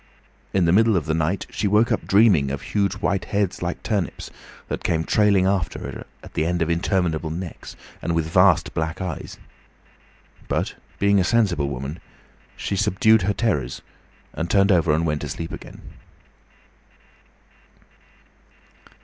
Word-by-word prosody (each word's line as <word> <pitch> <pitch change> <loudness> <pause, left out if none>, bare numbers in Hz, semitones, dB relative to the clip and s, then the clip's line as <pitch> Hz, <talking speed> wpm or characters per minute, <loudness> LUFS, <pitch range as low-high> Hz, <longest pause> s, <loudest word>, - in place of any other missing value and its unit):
In 95 -3 +2
the 85 - +3
middle 110 +2 +4
of 80 - -2
the 80 - -1
night 80 +5 -1
she 105 - -1
woke 105 +4 +3
up 110 - -1
dreaming 95 -9 +4
of 70 0 -4
huge 100 -2 0
white 95 -2 -1
heads 100 -3 -1
like 85 0 -4
turnips, 100 -6 -3 0.4
that - - -4
came 80 -1 0
trailing 100 +3 +3
after 95 -6 0
her, - - -7 0.2
at - - -12
the - - 0
end 85 +1 0
of 85 - -1
interminable 85 -2 0
necks, 85 +1 -7 0.3
and 85 - -1
with 80 -1 0
vast 80 - +3
black 80 +2 -2
eyes. 90 -2 -5 1.1
But - - -1 0.2
being 100 0 +3
a - - +3
sensible 90 -9 +1
woman, 70 +5 -5 0.6
she 100 - -3
subdued 110 +3 +3
her 100 +3 0
terrors 75 - -1 0.5
and 85 +2 -3
turned 100 +1 +4
over 85 -4 +3
and 80 +2 +1
went 75 -2 -1
to - - -5
sleep 80 - -5
again. - - -10
90 Hz, 155 wpm, -23 LUFS, 80-100 Hz, 1.1 s, middle